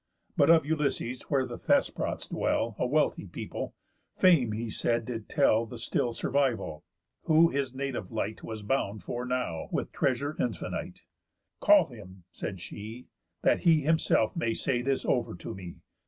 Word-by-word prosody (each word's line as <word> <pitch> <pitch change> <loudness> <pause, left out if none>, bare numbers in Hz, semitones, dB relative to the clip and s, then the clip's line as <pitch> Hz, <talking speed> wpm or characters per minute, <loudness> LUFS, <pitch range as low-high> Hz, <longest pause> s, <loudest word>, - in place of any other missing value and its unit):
But - - +4
of 165 -3 +6
Ulysses, 140 -5 -1
where 135 -3 +2
the - - -7
Thesprots - - 0
dwell, 115 -2 0
A - - +1
wealthy 150 +4 +1
people, - - -6 0.4
Fame, 160 -12 +5
he 110 +1 -3
says, 115 +1 0
did 115 -2 -6
tell 115 -6 +3
The 120 - -8
still 120 +1 -1
survival; 120 - -1 0.4
who 160 +1 +6
his 135 -3 -2
native 130 -8 -4
light 110 +2 -3
Was 110 -2 -6
bound 105 -4 -1
for 120 +5 -4
now, 125 -11 -2
with - - -2
treasure 140 +3 0
infinite." 120 -3 -3 0.6
"Call - - +6
him," 95 0 -12
said 95 +2 -5
she, 110 +7 -8 0.3
"that - - +4
he 160 -3 +4
himself 150 -7 +2
may 115 -9 0
say 125 -3 0
This 135 +1 -1
over 120 -8 0
to 85 - -7
me. 90 -2 -9
125 Hz, 155 wpm, -29 LUFS, 110-140 Hz, 0.6 s, of